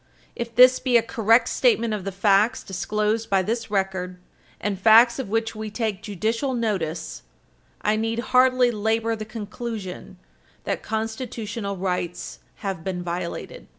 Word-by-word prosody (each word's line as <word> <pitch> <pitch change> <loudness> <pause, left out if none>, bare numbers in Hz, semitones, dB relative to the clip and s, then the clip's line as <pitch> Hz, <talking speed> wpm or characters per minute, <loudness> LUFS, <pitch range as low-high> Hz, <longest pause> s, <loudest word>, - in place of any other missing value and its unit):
If 235 -1 -5
this 255 +1 +7
be 255 -2 +3
a 230 - +2
correct 230 +1 +3
statement 415 - +2
of 200 -3 -4
the 195 - -2
facts 200 +5 +2
disclosed 210 +4 -1
by 195 -1 +3
this 225 +3 -3
record, 190 -2 -2 0.4
and 200 -2 -2
facts 230 +4 +6
of 250 -7 -4
which 225 +1 -1
we 215 -1 -5
take 215 -2 -3
judicial 225 - -2
notice, 195 -9 -2 0.6
I 210 +1 +2
need 225 +1 -1 0.2
hardly 255 -1 +5
labor 225 +1 0
the 215 -1 -6
conclusion 215 -4 -7 0.5
that - - -2
Constitutional 220 -2 -4
rights 180 -2 -3 0.3
have 190 -5 -3
been 180 -1 -3
violated. 175 0 -5
215 Hz, 145 wpm, -24 LUFS, 195-230 Hz, 0.6 s, this